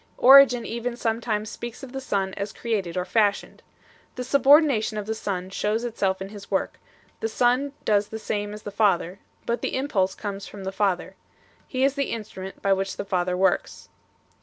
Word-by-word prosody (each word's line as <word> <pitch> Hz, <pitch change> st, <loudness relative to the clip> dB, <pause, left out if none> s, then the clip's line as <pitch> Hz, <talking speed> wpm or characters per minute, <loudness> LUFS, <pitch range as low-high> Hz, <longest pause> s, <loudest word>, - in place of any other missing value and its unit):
Origen 260 Hz, -2 st, +7 dB
even 235 Hz, +1 st, -4 dB
sometimes 225 Hz, -2 st, -2 dB
speaks 240 Hz, +3 st, -8 dB
of 265 Hz, -, -8 dB
the 270 Hz, 0 st, -5 dB
Son 195 Hz, -6 st, -1 dB
as 200 Hz, +1 st, -4 dB
created 200 Hz, -7 st, -3 dB
or 180 Hz, -, -1 dB
fashioned. 200 Hz, +2 st, 0 dB, 0.5 s
The 250 Hz, -, -4 dB
subordination 275 Hz, -5 st, +4 dB
of 210 Hz, -, -3 dB
the 220 Hz, -, -2 dB
Son 190 Hz, -4 st, -4 dB
shows 210 Hz, +3 st, -1 dB
itself 195 Hz, -5 st, -1 dB
in 195 Hz, -, -8 dB
His 205 Hz, -1 st, -11 dB
work, 195 Hz, -, -1 dB, 0.4 s
the -, -, -1 dB
Son 250 Hz, +5 st, +1 dB
does 205 Hz, -1 st, +2 dB
the 220 Hz, -, -6 dB
same 205 Hz, -1 st, -3 dB
as 210 Hz, 0 st, -9 dB
the 205 Hz, -, -6 dB
Father, 195 Hz, -3 st, +1 dB, 0.3 s
but 235 Hz, +1 st, -1 dB
the -, -, -2 dB
impulse 200 Hz, -9 st, 0 dB
comes 200 Hz, -1 st, -6 dB
from 200 Hz, -2 st, -10 dB
the 190 Hz, -, -3 dB
Father; 195 Hz, -2 st, -1 dB, 0.5 s
He 260 Hz, 0 st, -1 dB
is 275 Hz, 0 st, +3 dB
the 280 Hz, -1 st, -2 dB
in 225 Hz, -2 st, -3 dB
strument 190 Hz, -2 st, -10 dB
by 195 Hz, -, +4 dB
which 195 Hz, 0 st, -2 dB
the 200 Hz, -, -4 dB
Father 180 Hz, -1 st, 0 dB
works. 190 Hz, +1 st, 0 dB
210 Hz, 190 wpm, -25 LUFS, 195-240 Hz, 0.5 s, Origen